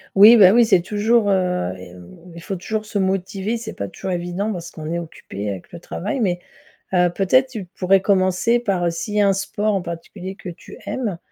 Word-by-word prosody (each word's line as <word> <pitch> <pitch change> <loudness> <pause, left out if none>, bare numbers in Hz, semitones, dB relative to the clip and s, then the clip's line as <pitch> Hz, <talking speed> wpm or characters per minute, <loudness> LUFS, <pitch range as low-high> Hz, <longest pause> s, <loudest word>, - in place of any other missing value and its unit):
Oui, 215 +4 +9
bah 190 -3 +8
oui 235 -1 +6
c'est 190 -6 +4
toujours, 210 +3 +1
heu 180 - 0
et 90 -1 -11
mmh, 90 - -14
il 170 - -9
faut 195 - -4
toujours 215 +4 -4
se 210 -1 -3
motiver. 195 +3 -1
C'est 225 -1 -7
pas 100 - -5
toujours 190 - -6
évident 180 +4 -2
parce 170 -3 -6
qu'on 155 0 -7
est 170 - -1
occupé 105 - -7
avec 95 -3 -7
le 170 - -9
travail 210 +8 -4
mais 180 -5 0 0.5
heu, 180 -1 +4
peut-être 255 +9 +3
tu 215 -7 -6
pourrais 190 +1 +2
commencer 195 +4 +2
par, 190 -6 -1
heu, - - +2
s'il 205 +6 -5
y 210 - +4
a 200 - +4
un 195 - +4
sport 205 +2 -1
en 195 - 0
particulier 180 +3 -7
que 185 - -8
tu 170 - -12
aimes, 215 -9 -3
190 Hz, 225 wpm, -21 LUFS, 175-210 Hz, 0.5 s, Oui